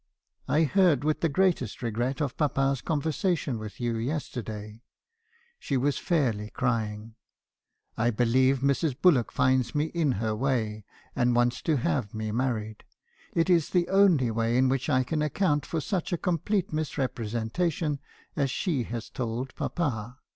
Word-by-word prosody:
I 155 +2 +3
heard 170 -4 +3
with 155 0 0
the 165 - +2
greatest 150 - 0
regret 120 +5 -1
of 140 - -3
papa's 135 -3 +1
conversation 155 - -1
with 105 -2 -8
you 120 -2 -1
yesterday.' 115 -5 -4 0.8
She 140 - -1
was 140 +3 +1
fairly 120 - 0
crying. 110 -4 -2 0.9
'I 120 +1 +3
believe 125 +3 +2
Mrs. 140 0 +1
Bullock 145 -11 +4
finds 130 -1 +1
me 150 +1 +2
in 160 -6 +1
her 110 0 -1
way, 110 -4 -1 0.3
and 120 0 +2
wants 120 +1 +2
to 155 -3 +1
have 100 - -1
me 110 0 -3
married. 110 -3 -2 0.5
It 165 +1 +2
is 170 -4 +3
the 175 -2 +1
only 180 -11 +4
way 115 +2 +1
in 130 0 +4
which 135 -1 -1
I 130 0 +3
can 155 +4 -2
account 150 0 +1
for 165 - -2
such 175 +4 -2
a 175 - +1
complete 180 +2 -1
misrepresentation 145 - -1 0.4
as 140 -2 +1
she 160 -1 -1
had 115 0 -4
told 125 +1 -3
papa. 125 -7 -3
130 Hz, 150 wpm, -27 LUFS, 115-155 Hz, 0.9 s, Bullock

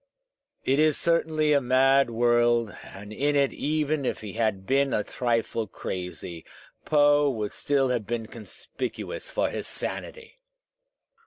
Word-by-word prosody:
It 135 +2 +2
is 155 -1 +4
certainly 160 -2 +2
a 140 - +4
mad 135 +1 +4
world, 120 -1 +2
and 105 +2 -10
in 145 +5 0
it, 140 -1 +2
even 155 -1 -1
if - - -2
he 105 -3 -7
had 110 -4 -1
been 135 +2 +2
a 105 - 0
trifle 115 -2 -1
crazy, 90 -3 -6 0.4
Poe 145 -1 +4
would 110 -5 -3
still 140 -2 +1
have 120 -5 -1
been 115 -1 -2
conspicuous 115 - -7
for - - 0
his - - -4
sanity! 475 +1 -6
130 Hz, 140 wpm, -26 LUFS, 110-145 Hz, 0.4 s, is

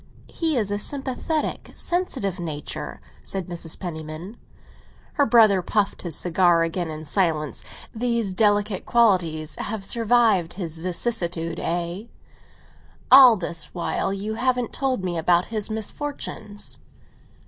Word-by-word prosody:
"He 320 -4 +1
is 210 -4 0
a 205 - -1
sympathetic, 280 +5 -1
sensitive 265 - -1
nature," 155 -4 -5 0.2
said 190 -2 -5
Mrs. 170 -2 -3
Penniman. 160 +3 -7 0.8
Her 285 - +2
brother 220 -5 +5
puffed 200 +3 -1
his 170 -4 -2
cigar 175 -1 +3
again 165 0 -2
in 155 0 -7
silence. 155 -3 0 0.3
"These 235 -4 -1
delicate 205 -1 +1
qualities 180 -10 +2
have 210 -2 -3
survived 225 -6 +2
his 165 -4 -4
vicissitudes, 170 -3 0
eh? 175 +4 -2 1.1
All 255 -4 +9
this 170 -3 -2
while 175 +2 -1
you 200 +2 -3
haven't 250 +1 0
told 260 -7 -1
me 175 -2 -2
about 175 +2 +3
his 215 -1 -2
misfortunes." 220 -2 -5
195 Hz, 120 wpm, -23 LUFS, 170-230 Hz, 1.1 s, All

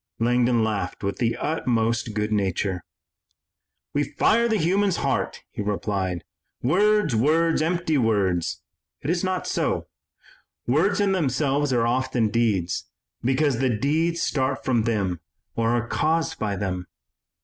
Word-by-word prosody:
Langdon 120 0 +2
laughed 105 -4 -2
with 100 0 -2
the 115 -1 0
utmost 115 -7 0
good 105 0 -1
nature. 95 -2 0 1.1
"We 145 - +2
fire 235 +9 +2
the 220 -2 +1
human 195 +4 +2
heart," 140 -7 -1
he - - -5
replied. 100 -3 -2 0.4
"'Words, 205 - +3
words, 160 +7 +3
empty 165 -2 +1
words,' 100 -7 0 0.4
it 150 - 0
is 175 +1 0
not 185 -1 -1
so. - - -1 0.8
Words 175 +11 +2
in 200 -1 +2
themselves 145 -4 +1
are 120 -2 +2
often 125 -2 +1
deeds, 105 -6 0 0.3
because 135 +1 +2
the 130 -1 +2
deeds 160 +9 0
start 130 -1 -1
from 120 -4 +2
them 100 -7 0 0.4
or 115 0 +1
are 120 0 0
caused 160 +4 0
by 105 -2 -1
them. 90 -2 -3
125 Hz, 135 wpm, -24 LUFS, 105-160 Hz, 1.1 s, Words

